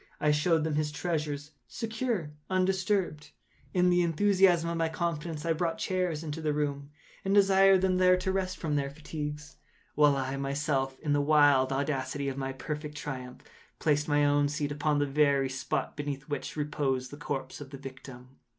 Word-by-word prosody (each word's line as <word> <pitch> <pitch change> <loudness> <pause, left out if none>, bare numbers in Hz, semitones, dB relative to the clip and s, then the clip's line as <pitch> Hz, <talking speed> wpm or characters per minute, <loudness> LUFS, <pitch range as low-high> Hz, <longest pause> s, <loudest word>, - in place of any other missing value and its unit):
I 150 - +3
showed 155 +2 +2
them 160 -1 -1
his 150 0 0
treasures, 150 -2 -3 0.2
secure, 225 -8 -3 0.2
undisturbed. 185 -3 0 0.4
In 180 0 +3
the 175 0 +4
enthusiasm 180 0 +3
of - - -2
my 165 -1 +1
confidence, 165 -2 -3
I 165 - +2
brought 165 0 -1
chairs 180 -4 -1
into 160 0 -5
the 155 -1 0
room, 140 -1 -2 0.3
and 195 +1 +1
desired 195 -1 +6
them 185 -1 +2
here 185 0 +5
to 185 +1 -1
rest 185 -1 -2
from 150 -3 -1
their 140 -1 -1
fatigues, 150 +1 -6 0.4
while 145 -2 +4
I 135 0 -2
myself, 135 -1 -1
in 150 -2 0
the 145 - +3
wild 145 -3 +4
audacity 140 0 -1
of 135 - -4
my 135 -1 -2
perfect 150 +3 -6
triumph, 130 -4 -6 0.3
placed 150 -1 +1
my 145 -1 +3
own 145 0 +3
seat 145 -1 -2
upon 150 0 0
the 145 - +2
very 140 -1 +2
spot 130 0 -3
beneath 145 -2 -4
which 145 - -4
reposed 140 -4 -1
the 145 - -8
corpse 135 -2 -5
of 140 - -8
the 140 - -8
victim. 130 -1 -11
150 Hz, 180 wpm, -29 LUFS, 140-170 Hz, 0.4 s, desired